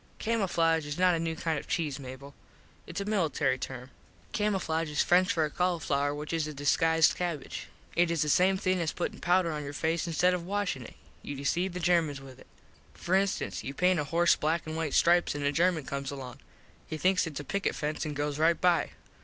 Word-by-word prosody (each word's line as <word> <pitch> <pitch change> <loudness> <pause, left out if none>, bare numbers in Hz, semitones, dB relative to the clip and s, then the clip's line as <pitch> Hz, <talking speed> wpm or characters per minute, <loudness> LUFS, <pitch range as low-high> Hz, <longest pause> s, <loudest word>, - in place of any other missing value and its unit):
Camooflage 165 -8 +1
is 145 - -4
not 180 0 +4
a 165 - 0
new 165 0 -2
kind 160 -2 -1
of - - -12
cheese 150 -4 -1
Mable. 135 +1 -9 0.5
Its 170 - -5
a 200 - -3
military 160 -10 +1
term. 130 0 -7 0.4
Camooflage 185 -7 0
is 150 - +1
French 185 +1 +4
for 160 -2 +1
cauliflower 150 -4 0
which 150 +2 -5
is 160 -2 0
a 155 - -7
disguised 160 +3 +3
cabbage. 170 -5 -4 0.3
It 175 0 +3
is 170 -3 +1
the - - -3
same 185 +5 +4
thing 185 -1 0
as 160 - 0
puttin 175 - -4
powder 180 -1 +2
on 150 -1 -4
your 145 0 -6
face 160 +3 -1
instead 175 +2 +2
of 180 -1 -2
washin 195 -6 -2
it. - - -12 0.3
You 145 - -6
deceive 175 +6 -1
Germans 165 -5 +2
with 135 -2 -13
it. - - -16 0.5
For 175 - -3
instance 195 0 0
you 135 - -6
paint 180 +1 +3
a 150 - -1
horse 170 +3 +3
black 160 +2 -1
and 155 0 -5
white 160 -3 -2
stripes 175 -2 +4
an 145 - -3
a 140 - +2
German 165 -1 +1
comes 140 0 -4
along. 130 -2 -7 0.5
He 155 - -4
thinks 185 +1 +2
its 150 -3 -5
a - - -5
picket 200 +7 -1
fence 150 0 -3
an 150 -2 -4
goes 145 0 -2
right 165 +1 +3
by. 175 -2 +2
165 Hz, 210 wpm, -29 LUFS, 145-180 Hz, 0.5 s, not